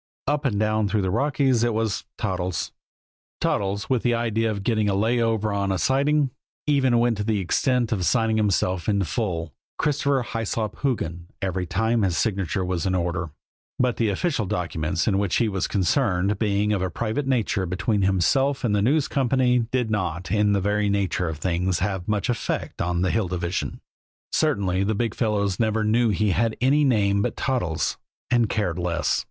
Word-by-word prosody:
Up 145 +1 0
and 105 -7 +1
down 110 0 +1
through 100 0 0
the 95 - 0
Rockies 135 0 +2
it 120 -2 +1
was 110 -2 -1
Toddles. 90 -1 -2 0.7
Toddles, 100 0 -1
with 130 -3 +1
the 120 -1 +2
idea 115 -1 0
of 100 -2 -3
getting 110 -2 +1
a 100 - +1
lay 115 +4 +2
over 110 -2 0
on 100 -1 0
a 95 - 0
siding, 140 +4 +2 0.3
even 135 -5 +3
went 120 -1 +2
to 105 - -2
the 110 0 0
extent 120 +5 +1
of 100 -5 0
signing 115 +2 +2
himself 95 -3 +1
in 100 -2 +2
full 85 -1 -3 0.2
Christopher 140 -2 +1
Hyslop 115 -2 -3
Hoogan 85 - -2
every 95 -2 -2
time 110 +6 +1
his 90 -5 +1
signature 95 +2 -1
was 90 -1 -1
in 95 - 0
order; 85 -1 -1 0.5
but 125 -2 +1
the 115 -2 +1
official 115 - -1
documents 85 +1 -2
in 100 -3 +2
which 100 -3 0
he 115 - +2
was 95 -3 -1
concerned, 100 -1 +1
being 105 -1 +1
of 100 - 0
a 95 - 0
private 115 +8 -2
nature 110 -7 0
between 100 +4 0
himself 130 +9 +2
and 110 -4 +1
the 100 - +2
News 140 +7 +2
Company, 125 -3 +2
did 125 -3 -1
not, 90 -4 -2
in 105 0 +3
the 100 - +2
very 105 +1 +1
nature 95 -3 0
of 80 - -5
things, 90 +2 0
have 95 -1 -2
much 105 0 0
effect 120 -3 -2
on 90 0 0
the 95 - +1
Hill 110 -4 0
Division. 85 0 -3 0.5
Certainly 100 - +1
the 110 +1 0
big 115 +2 -1
fellows 100 -4 0
never 110 -1 +1
knew 115 +2 +3
he 105 0 +1
had 110 +5 0
any 140 +4 +3
name 100 -7 +2
but - - -2
Toddles 115 - -1 0.3
and 120 -3 +3
cared 90 -6 -1
less. 85 -3 0
105 Hz, 185 wpm, -24 LUFS, 95-120 Hz, 0.7 s, even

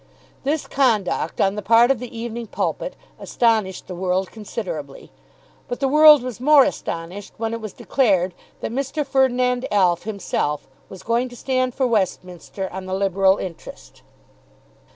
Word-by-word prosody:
This 290 +3 -1
conduct 220 - 0
on 195 - +3
the 210 - -4
part 230 +5 +5
of 270 - 0
the 250 0 -7
"Evening 235 0 -5
Pulpit" - - -3 0.2
astonished 220 -6 0
the 185 - -7
world 185 +1 -1
considerably; 360 - -7 0.6
but 245 - -4
the 270 - +1
world 300 -1 +7
was 250 -3 -6
more 290 +2 +6
astonished 185 - -5
when 225 0 -2
it 230 - -4
was 215 -2 -6
declared 190 -10 +1 0.3
that - - -3
Mr. 275 +3 -2
Ferdinand 250 -2 +1
Alf 180 -4 +3
himself 195 -8 -2 0.2
was 190 - -11
going 235 +2 0
to 245 - -12
stand 255 0 -1
for 265 - +1
Westminster 190 -4 -2
on 190 0 -6
the 185 - -2
Liberal 195 0 +2
interest. 175 -3 -9
225 Hz, 150 wpm, -22 LUFS, 190-255 Hz, 0.6 s, world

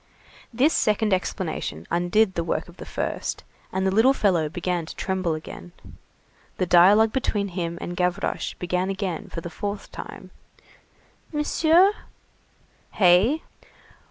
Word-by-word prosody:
This 260 +7 +3
second 215 -1 +2
explanation 85 - -3
undid 175 +4 +2
the 170 - -2
work - - -2
of - - -16
the - - -9
first, - - -3 0.3
and 190 0 -1
the 190 - +2
little 225 +7 +5
fellow 175 - +1
began 175 +1 -2
to - - -8
tremble 185 -4 -1
again. 165 +2 -9 0.8
The 185 - +1
dialogue 200 +6 +6
between 205 -6 -1
him 170 -2 -4
and 175 - -5
Gavroche 180 0 -1
began 180 +1 -2
again 190 -4 -3
for 165 - -6
the 170 - -6
fourth 205 +2 -5
time:— - - -9 1.0
"Monsieur?" 325 +5 +4 1.0
"Hey?" 200 - +4
190 Hz, 130 wpm, -24 LUFS, 175-220 Hz, 1.0 s, dialogue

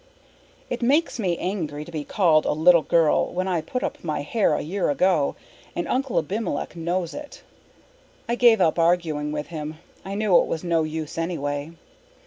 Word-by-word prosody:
It 245 - -4
makes 280 +3 +2
me 180 -5 0
angry 155 -6 -3
to 170 - -11
be 155 -3 -4
called 160 -3 +3
a - - +2
little 170 +2 +5
girl 160 -1 +2
when 185 +1 -2
I 175 -3 0
put 250 +11 -4
up - - -4
my 150 -3 -2
hair 215 +7 +1
a - - -2
year 185 +5 -1
ago, 155 0 +2 0.4
and 175 - -2
Uncle 260 0 -1
Abimelech 185 -2 -2
knows 170 +1 -2
it. 290 0 -9 0.8
I 235 - 0
gave 240 -2 +5
up 170 -2 +2
arguing 165 -3 +1
with 150 0 -4
him. 155 -2 -5 0.3
I 195 +1 -5
knew 210 -3 +2
it - - 0
was 160 - -3
no 170 -2 +1
use 155 0 -4
anyway. 145 -2 -3
170 Hz, 180 wpm, -24 LUFS, 155-195 Hz, 0.8 s, little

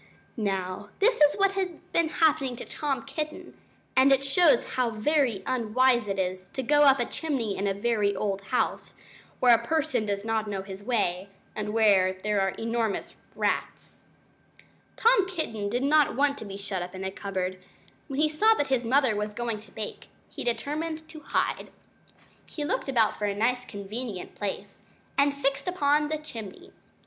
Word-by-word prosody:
Now, 195 -2 -3
this 450 -2 +3
is 295 0 +6
what 395 -1 +3
had 375 -4 -3
been 335 -1 +2
happening 280 -6 +2
to 240 - -8
Tom 285 -3 -3
Kitten, 300 +3 -5 0.4
and 265 +1 +6
it 270 0 +3
shows 280 -2 +5
how 250 -2 +1
very 230 -2 +1
unwise 245 0 +2
it 195 -1 -2
is 185 0 -2
to 265 - -3
go 295 +3 +5
up 275 -1 +6
a 240 - +1
chimney 250 -9 -2
in 200 - -1
a 195 - +1
very 205 -1 +1
old 195 -2 -2
house, 250 - -1 0.4
where 245 -1 +6
a 235 0 +3
person 315 -6 0
does 200 0 -2
not 220 -1 0
know 195 -2 -3
his 195 0 -9
way, 200 -5 -1 0.3
and 210 0 -3
where 200 -4 +4
there 210 -1 +1
are 195 - +2
enormous 230 -2 -2 0.2
rats. - - -2 1.0
Tom 450 -5 +4
Kitten 225 - -3
did 245 +5 -1
not 300 +1 +4
want 280 +1 +2
to - - -7
be 195 -1 -7
shut 195 -2 -4
up 180 +1 -6
in 185 - -6
a 190 - -2
cupboard. 185 -2 -3 0.5
When 275 -2 -4
he 310 - +4
saw 430 +9 +4
that 290 - -1
his 260 -2 +1
mother 260 -2 +3
was 210 0 -3
going 235 -2 -2
to 210 -2 -17
bake, 215 -1 -7 0.2
he - - -7
determined 310 +6 -3
to 315 -1 -10
hide. - - -1 0.8
He 295 - -5
looked 290 - -2
about 230 -5 +2
for 210 - 0
a 200 -1 -1
nice 245 +4 0
convenient 205 0 -6
place, 200 0 -5 0.3
and 280 +1 +4
he 280 0 -12
fixed 275 +4 0
upon 295 -4 +2
the 310 - -1
chimney. 225 -10 -9
235 Hz, 180 wpm, -27 LUFS, 205-290 Hz, 1.0 s, is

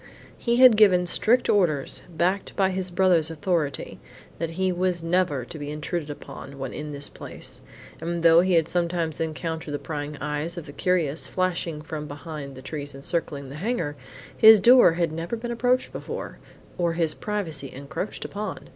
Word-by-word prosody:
He 235 -1 0
had 250 -3 +8
given 185 -4 +5
strict 230 +7 +2
orders, 160 -9 +2
backed 180 +4 -1
by 190 -1 +2
his 185 0 -1
brother's 175 -3 +3
authority, 165 -2 -2 0.4
that 165 0 -2
he 190 0 +1
was 180 -1 -1
never 165 -7 +1
to 155 - -9
be 145 0 -5
intruded 150 +1 -4
upon 140 -1 -9
when 135 -2 -5
in 150 0 -6
this 145 0 -3
place; - - -10 0.4
and 170 0 -3
though 165 0 +7
he 185 0 +1
had 165 -2 +4
sometimes 170 -2 -1
encountered 160 0 -3
the 145 - -2
prying 150 -1 -5
eyes 150 +4 -3
of 170 - -6
the - - -9
curious 165 -4 0
flashing 175 -4 -2
from 155 -1 -6
behind 145 -1 -7
the 130 - -11
trees 145 -2 -6
encircling 140 -1 -3
the 140 - -8
hangar, 180 -10 -1 0.4
his 220 -1 +9
door 240 -3 +7
had 170 -1 0
never 165 +7 -3
been 235 +1 -5
approached 245 +2 +1
before, - - -6 0.4
or 170 -1 +1
his 165 -2 0
privacy 165 -10 -4
encroached 140 +9 -6
upon. 205 -1 -6
165 Hz, 175 wpm, -25 LUFS, 150-185 Hz, 0.4 s, his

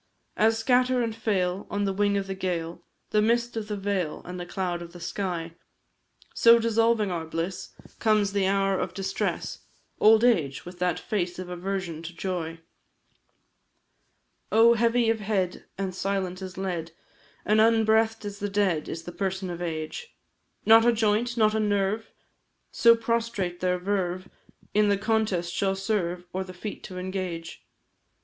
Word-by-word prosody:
As 225 +1 +3
scatter 250 +2 +2
and 225 -1 -3
fail, 195 -4 -1
on 205 0 -1
the 195 - 0
wing 205 +1 +2
of 200 - -1
the 195 - -4
gale, 175 -3 -3 0.3
The 210 - +3
mist 235 +2 +1
of 220 -2 -3
the 210 -1 -3
vale, 195 -5 -2
and 180 0 -6
the 175 - -6
cloud 175 -2 -2
of 170 0 -9
the 175 - -10
sky, 170 -2 -3 0.8
So, 235 0 +7
dissolving 230 -2 +2
our 170 -2 -2
bliss, 165 +3 -4 0.2
comes 215 -3 +2
the 200 -2 +2
hour 195 0 +1
of 185 - -3
distress, 195 0 -2 0.4
Old 220 +1 +6
age, 160 - +2
with 175 0 -10
that 180 -1 +1
face 180 -4 -2
of 185 -1 -6
aversion 180 -2 -4
to 170 +1 -8
joy. 165 -3 -4 1.9
Oh! 230 +2 +6
heavy 235 0 +3
of 225 - -1
head, 195 -4 -1
and 190 -1 -3
silent 190 -1 -2
as 185 -1 -7
lead, 175 -4 -3 0.5
And 215 +1 +4
unbreathed 225 0 +3
as 205 0 -6
the 205 - -2
dead, 195 -6 0
is 165 - -5
the 175 - -7
person 190 0 -3
of 175 0 -6
Age; 165 - -5 0.5
Not 225 +1 +8
a 240 - +5
joint, 230 +2 +1
not 215 -1 +4
a 220 - +1
nerve 205 +1 0 0.6
so 230 0 +6
prostrate 230 -6 -1
their 180 0 +1
verve 185 -1 -2 0.5
In 210 0 +4
the 200 - +3
contest 205 -5 0
shall 195 -1 0
serve, 185 -3 -2
or 190 +1 -1
the 185 -1 -11
feat 205 +3 -7
to 185 - -8
engage. 180 -3 -5
195 Hz, 165 wpm, -26 LUFS, 180-220 Hz, 1.9 s, Not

